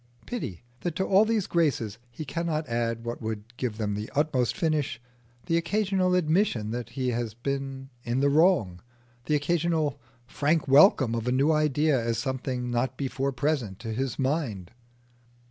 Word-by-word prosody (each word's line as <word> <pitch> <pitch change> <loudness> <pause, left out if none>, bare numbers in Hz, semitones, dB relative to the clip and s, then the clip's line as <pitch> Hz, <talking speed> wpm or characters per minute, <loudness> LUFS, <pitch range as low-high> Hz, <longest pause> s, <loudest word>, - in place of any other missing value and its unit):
Pity 120 - -5 0.2
that 175 -3 -3
to 190 - 0
all 200 +3 +5
these 220 -3 +1
graces 120 -10 0
he 120 +6 -7
cannot 160 0 -2
add 115 -1 -2
what 120 0 -4
would 110 +1 -5
give 120 -4 -3
them 105 -2 -1
the 105 +2 -4
utmost 140 -5 +1
finish 150 -8 0 0.5
the 165 -2 +2
occasional 185 +1 +1
admission 155 - +1
that 120 -1 -4
he 130 -1 0
has 115 -2 -2
been 135 +1 -4
in 120 +2 -1
the 140 - +3
wrong, 145 - +3 0.4
the 150 - +2
occasional 155 -2 0 0.2
frank 150 +4 0
welcome 135 - +6
of 115 0 -2
a - - +2
new 135 +5 +3
idea 150 -3 +2
as 115 -1 0
something 125 0 -2
not 125 +2 -1
before 135 0 -1
present 130 -7 -1
to 115 +1 -5
his 130 +2 -2
mind! 130 - -1
135 Hz, 165 wpm, -27 LUFS, 120-155 Hz, 0.5 s, welcome